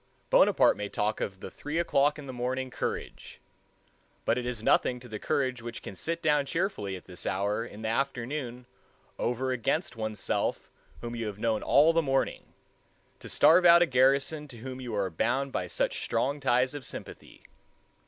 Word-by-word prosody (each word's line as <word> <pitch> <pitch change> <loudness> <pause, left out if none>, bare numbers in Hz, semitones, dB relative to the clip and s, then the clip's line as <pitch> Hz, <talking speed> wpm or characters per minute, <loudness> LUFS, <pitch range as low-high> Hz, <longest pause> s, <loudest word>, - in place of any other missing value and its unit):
Bonaparte - - +5
may 105 0 -4
talk 105 +2 -1
of 95 -1 -4
the - - -7
three 150 +2 -5
o'clock 150 -4 +2
in 150 - -8
the 130 - -7
morning 130 +1 -2
courage, - - -5 0.9
but - - +3
it 125 0 -3
is 120 -3 -4
nothing 125 +2 +3
to 125 - -12
the 110 -2 -6
courage 130 -3 -1
which 115 0 -7
can 100 - -8
sit 170 - -3
down 150 -2 +3
cheerfully 140 - -2
at 90 - -10
this 90 -1 -7
hour 100 +3 -1
in 110 -2 -10
the - - -1
afternoon 125 0 -2 0.5
over 130 +2 -1
against 130 - -1
one's 110 -2 -4
self - - -2 0.3
whom 120 0 -5
you 115 -2 -3
have 105 -1 -5
known 110 0 0
all 155 +4 +5
the 165 - +3
morning, 135 -3 -1 0.7
to - - -10
starve 165 +5 +6
out 170 0 +8
a - - +3
garrison 135 +3 +2
to 125 -4 -12
whom 130 +2 -7
you 120 -4 -4
are 100 -2 -1
bound 125 +10 0
by 90 - -2
such - - -1
strong 140 +3 0
ties 125 -1 +2
of 145 -2 -6
sympathy. - - -10
125 Hz, 185 wpm, -29 LUFS, 110-140 Hz, 0.9 s, out